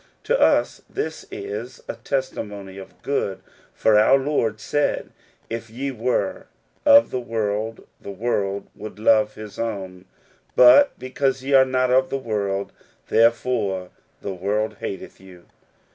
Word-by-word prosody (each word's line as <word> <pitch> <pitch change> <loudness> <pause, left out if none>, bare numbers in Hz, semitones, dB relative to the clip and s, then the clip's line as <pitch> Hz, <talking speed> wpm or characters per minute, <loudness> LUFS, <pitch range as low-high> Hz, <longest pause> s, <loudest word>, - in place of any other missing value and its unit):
To - - +1
us - - +3
this 420 - -4
is 410 +4 -7
a^ - - -4
testimony 105 -8 -4
for 95 - -9 0.2
good, 135 -8 -1 0.3
for 110 -1 +3
our 110 +5 +6
Lord 130 -6 -1
said, 145 +5 -1 0.4
If 115 0 -6
ye 135 +5 -4
were 125 - -2 0.4
of 285 0 +7
the 130 - -1
world, 110 -1 -3 0.2
the - - -9
world 100 -1 -2
would 110 0 -9
love 110 -1 +3
his 105 -1 -10
own; 95 -5 -4 0.5
but 125 - +7
be 130 - -8
cause 135 -1 0
ye 140 +1 -1
are 135 -1 +7
not 130 -1 +1
of 130 +1 +3
the 135 - -1
world, 100 -5 -2 0.4
therefore 115 -5 +1 0.3
the 100 - -4
world 105 +4 -2
hateth 95 - -6
you." 90 -2 -15
115 Hz, 145 wpm, -23 LUFS, 100-130 Hz, 0.5 s, of